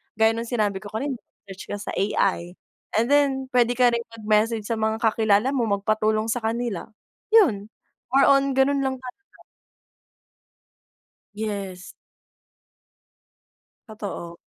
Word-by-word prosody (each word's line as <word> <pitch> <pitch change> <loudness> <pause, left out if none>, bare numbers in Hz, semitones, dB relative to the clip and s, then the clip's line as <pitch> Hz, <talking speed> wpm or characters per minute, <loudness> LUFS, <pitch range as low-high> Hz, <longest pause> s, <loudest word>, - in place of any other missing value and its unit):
gaya 220 0 +4
ng 230 +1 -4
sinabi 210 -5 0
ko 205 - -10
kanina 265 +4 -3 0.3
search 190 0 -9
ka - - -3
sa - - -7
AI 185 -3 0 0.5
and 230 - -1
then 275 -2 +2
puwede 245 -1 +3
ka 245 0 +4
rin 235 0 -2
mag-message 215 +1 +1
sa 230 - -1
mga 220 0 -1
kakilala 220 +1 +3
mo 265 -4 0
magpatulong 215 +1 0
sa 225 - 0
kanila, 225 -3 -2 0.5
yun, 265 - +5 0.5
more 275 +1 +5
on 275 0 +4
ganun 270 +1 +2
lang 265 0 -1
talaga. 255 +10 -13 1.9
Yes. 200 -4 -5 2.0
Totoo. 200 -6 -7
225 Hz, 125 wpm, -24 LUFS, 210-255 Hz, 2.0 s, yun